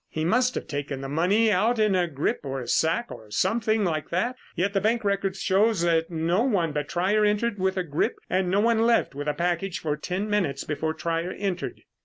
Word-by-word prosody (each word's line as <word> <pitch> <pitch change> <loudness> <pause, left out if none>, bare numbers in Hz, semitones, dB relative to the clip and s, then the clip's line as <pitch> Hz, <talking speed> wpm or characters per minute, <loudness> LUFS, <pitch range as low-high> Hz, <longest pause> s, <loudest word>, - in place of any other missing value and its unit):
He 155 0 -3
must 250 +7 +2
have - - -3
taken 145 -2 -4
the 135 - -5
money 190 +10 +2
out 215 +5 +2
in 215 -2 +3
a 180 -2 +2
grip 145 -3 -1
or 135 -1 -4
a 125 - -7
sack 170 +9 +1
or 110 -1 -10
something 215 - +1
like 155 -5 -1
that, 230 +9 0 0.2
yet 195 +3 0
the 195 - +1
bank 225 +2 +1
record 195 -1 0
shows 195 +1 +2
that 165 -1 +2
no 170 +4 0
one 195 - +1
but 145 -1 -3
Trier 195 +5 +1
entered 210 +1 +1
with 190 0 0
a 185 - +1
grip 150 -3 -1
and 185 -1 0
no 195 +3 +2
one 230 0 +3
left 235 -8 +2
with 145 +2 -5
a 150 - 0
package 175 +1 -1
for 150 -2 -2
ten 190 +6 -3
minutes 185 -10 0
before 155 +1 -2
Trier 165 +2 -2
entered." 195 -3 -3
185 Hz, 220 wpm, -26 LUFS, 160-210 Hz, 0.2 s, in